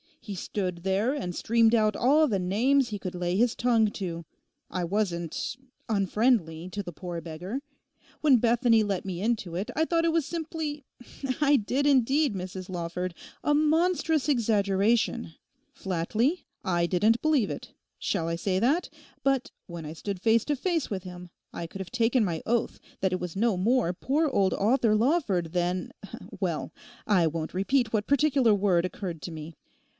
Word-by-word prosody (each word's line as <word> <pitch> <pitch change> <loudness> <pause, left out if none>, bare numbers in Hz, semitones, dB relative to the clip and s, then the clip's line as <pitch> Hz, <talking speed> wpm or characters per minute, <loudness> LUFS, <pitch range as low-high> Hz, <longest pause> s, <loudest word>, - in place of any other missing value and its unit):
He 210 - -7
stood 185 -1 -3
there 195 +7 +1
and 215 -12 -3
streamed 230 0 +3
out 215 -2 +2
all 295 +6 +4
the 205 -7 0
names 240 +9 +2
he 210 - -3
could 185 -2 -6
lay 175 0 -1
his 230 +3 +2
tongue 230 -3 +3
to. 170 -5 -5 0.4
I 180 0 -2
wasn't—unfriendly 200 - -1
to 205 +2 -4
the 175 - -7
poor 175 0 -6
beggar. 175 - -5 0.6
When 285 -5 +6
Bethany 235 -1 +3
let 200 -3 -2
me 185 -2 -4
into 210 -6 -1
it 195 +7 -3
I 320 - +2
thought 335 0 +1
it 335 - +3
was 325 -3 +1
simply—I 295 -3 -2
did 260 +4 0
indeed, 275 0 +3
Mrs 185 0 -6
Lawford—a 180 - -3
monstrous 315 0 +2
exaggeration. 220 - +1 0.4
Flatly, 215 - -1 0.2
I 175 -3 +1
didn't 215 +6 +2
believe 295 -10 +2
it; - - -8 0.3
shall 165 - -1
I 165 - -1
say 185 +2 0
that? 285 - +1 0.3
But 275 0 +1 0.2
when 170 -2 -7
I 150 - -6
stood 190 +2 -5
face 225 0 +3
to 295 - 0
face 330 +1 -1
with 190 -3 -4
him, 180 -1 -9 0.2
I 170 - -5
could 195 +3 -8
have 190 - -8
taken 240 0 +2
my 165 -4 -2
oath 235 0 0 0.2
that 190 - +2
that 185 0 -2
was 180 -2 -5
no 215 -1 +1
more 225 0 +2
poor 290 - 0
old 195 -7 +2
Arthur 225 +1 +3
Lawford 215 - +1
than—well, 180 0 -3 0.3
I 185 -6 +3
won't 160 0 -4
repeat 220 +5 +1
what 210 -1 0
particular 275 -5 +3
word 190 -4 +2
occurred 180 -4 -5
to 175 - -5
me. 160 0 -8
210 Hz, 160 wpm, -27 LUFS, 180-260 Hz, 0.6 s, When